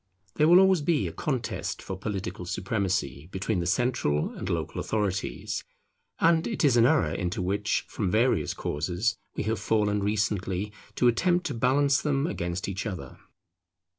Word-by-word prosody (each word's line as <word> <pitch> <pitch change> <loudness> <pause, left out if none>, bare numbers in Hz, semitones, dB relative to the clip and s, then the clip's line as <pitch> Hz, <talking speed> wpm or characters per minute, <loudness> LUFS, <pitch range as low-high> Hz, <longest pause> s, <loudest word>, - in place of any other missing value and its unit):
There 150 - +3
will 175 +2 +8
always 190 -3 +5
be 155 0 +1
a - - -4
contest 130 -6 -3
for 95 - -5
political 95 -3 -4
supremacy 95 - -2
between 95 +1 -1
the 85 - -2
central 100 - +1
and - - -5
local - - -2
authorities; 100 -3 -2 0.6
and 165 0 +3
it 220 -8 0
is 135 -4 +4
an 120 0 +6
error 80 -8 +2
into 90 0 -2
which, 100 +4 0
from 100 -4 -2
various 115 +6 +2
causes, 90 +9 -1 0.2
we - - -2
have 110 0 -1
fallen 105 -1 +1
recently, 100 -1 -1 0.2
to 125 - +3
attempt 175 +9 +2
to 145 - -2
balance 135 +4 +3
them 140 -1 +1
against 85 - -3
each 100 +3 -3
other. 85 -11 -7
105 Hz, 160 wpm, -27 LUFS, 95-130 Hz, 0.6 s, will